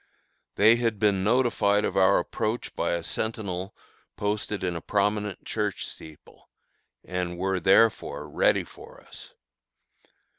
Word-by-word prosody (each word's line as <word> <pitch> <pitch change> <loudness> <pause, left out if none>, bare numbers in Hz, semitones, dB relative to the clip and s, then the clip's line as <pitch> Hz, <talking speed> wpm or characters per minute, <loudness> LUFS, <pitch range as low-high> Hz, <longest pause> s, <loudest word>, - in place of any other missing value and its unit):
They 110 +3 +6
had 115 -3 0
been 100 -2 +2
notified 105 -3 +2
of - - -3
our 95 -1 +5
approach 110 +3 -3
by - - -1
a 85 -1 -2
sentinel 100 -4 -4 0.4
posted 105 -1 -2
in 90 -2 -1
a 85 - -5
prominent 105 +1 -1
church 105 -3 -2
steeple, 80 -2 -14 0.6
and 90 -1 -3
were, 95 +1 -1
therefore, 95 -6 +2
ready 75 - +2
for - - -14
us. - - -13
100 Hz, 125 wpm, -26 LUFS, 90-110 Hz, 0.6 s, They